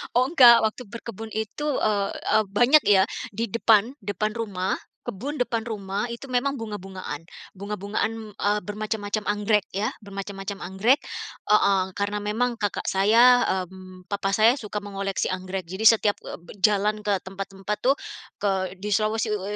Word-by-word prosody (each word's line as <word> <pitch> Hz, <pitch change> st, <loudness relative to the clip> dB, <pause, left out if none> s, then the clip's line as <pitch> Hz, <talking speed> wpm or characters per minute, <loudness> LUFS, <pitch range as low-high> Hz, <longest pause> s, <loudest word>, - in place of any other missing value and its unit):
Oh 255 Hz, +1 st, +4 dB
enggak. 245 Hz, -7 st, +8 dB
Waktu 220 Hz, +3 st, -1 dB
berkebun 225 Hz, -2 st, -8 dB
itu, 220 Hz, +7 st, -4 dB, 0.2 s
eee 205 Hz, -2 st, +1 dB
eee, 220 Hz, -, +2 dB
banyak 245 Hz, +8 st, +5 dB
ya 190 Hz, -2 st, +5 dB, 0.3 s
di 230 Hz, +3 st, -2 dB
depan, 230 Hz, +2 st, +3 dB
depan 210 Hz, +2 st, -2 dB
rumah, 200 Hz, -5 st, -2 dB, 0.3 s
kebun 240 Hz, +6 st, -5 dB
depan 230 Hz, -2 st, -1 dB
rumah 200 Hz, -1 st, -3 dB
itu 260 Hz, +3 st, -9 dB
memang 255 Hz, +3 st, +1 dB
bunga-bungaan. 190 Hz, -7 st, -6 dB, 0.3 s
Bunga-bungaan, 210 Hz, +2 st, -3 dB
eee, 205 Hz, +1 st, +1 dB
bermacam-macam 210 Hz, +1 st, -3 dB
anggrek 210 Hz, 0 st, +1 dB
ya, 210 Hz, +5 st, 0 dB
bermacam-macam 195 Hz, 0 st, -6 dB
anggrek 195 Hz, +10 st, +2 dB, 0.5 s
heeh, 200 Hz, -2 st, +4 dB
karena 205 Hz, +1 st, -1 dB
memang 230 Hz, +4 st, 0 dB
kakak 205 Hz, -2 st, -2 dB
saya, 230 Hz, +6 st, +5 dB, 0.2 s
mmm, 185 Hz, 0 st, -13 dB
papa 200 Hz, -1 st, -2 dB
saya 225 Hz, +3 st, +5 dB
suka 210 Hz, -1 st, -6 dB
mengoleksi 195 Hz, -1 st, -3 dB
anggrek 185 Hz, -1 st, -4 dB
jadi 190 Hz, +6 st, -5 dB
setiap, 205 Hz, -1 st, +1 dB
eee, -, -, -8 dB
be 170 Hz, -, -14 dB
jalan 210 Hz, +1 st, +2 dB
ke 205 Hz, -1 st, +1 dB
tempat-tempat 195 Hz, +1 st, -5 dB
tuh 270 Hz, +3 st, +3 dB, 0.4 s
ke 190 Hz, -2 st, -1 dB
di 205 Hz, +2 st, -2 dB
Sulawesi 215 Hz, 0 st, +1 dB
u 205 Hz, -, -2 dB
210 Hz, 150 wpm, -25 LUFS, 195-225 Hz, 0.5 s, enggak